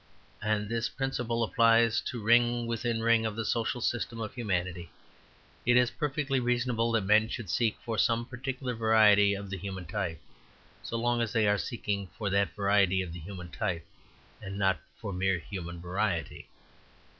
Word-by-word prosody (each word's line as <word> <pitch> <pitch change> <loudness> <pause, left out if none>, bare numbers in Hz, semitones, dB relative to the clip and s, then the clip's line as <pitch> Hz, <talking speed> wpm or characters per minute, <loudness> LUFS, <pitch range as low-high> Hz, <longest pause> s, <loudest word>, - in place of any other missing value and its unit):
And 105 -1 0
this 115 +1 -1
principle 120 -3 -2
applies 115 0 +4
to 120 -4 -5
ring 120 +1 +4
within 115 0 -2
ring 115 0 +4
of 110 -2 -2
the 115 0 -3
social 115 +2 -1
system 115 0 -2
of 110 -2 -4
humanity. 90 -7 -2 0.7
It 120 +1 +4
is 125 -1 +4
perfectly 140 -2 -1
reasonable 120 -1 0
that 115 - +3
men 110 +2 +4
should 115 -8 -5
seek 115 -3 +1
for 115 -3 -2
some 115 +2 +2
particular 130 0 -4
variety 110 -3 +5
of 100 -1 -7
the 95 - -3
human 95 -1 -6
type, 90 -4 -3 0.6
so 115 - -4
long 120 +1 +1
as 115 -3 -2
they 110 -2 +3
are 105 0 +3
seeking 100 -5 -3
for 100 -3 -2
that 100 0 +1
variety 100 -2 +3
of 85 -3 -7
the 85 - -7
human 90 +1 -8
type, 85 -3 -2 0.6
and 100 -1 -6
not 95 -4 +2 0.2
for 100 - -5
mere 95 0 +1
human 85 -1 -7
variety. 90 0 -2
110 Hz, 170 wpm, -29 LUFS, 100-115 Hz, 0.7 s, variety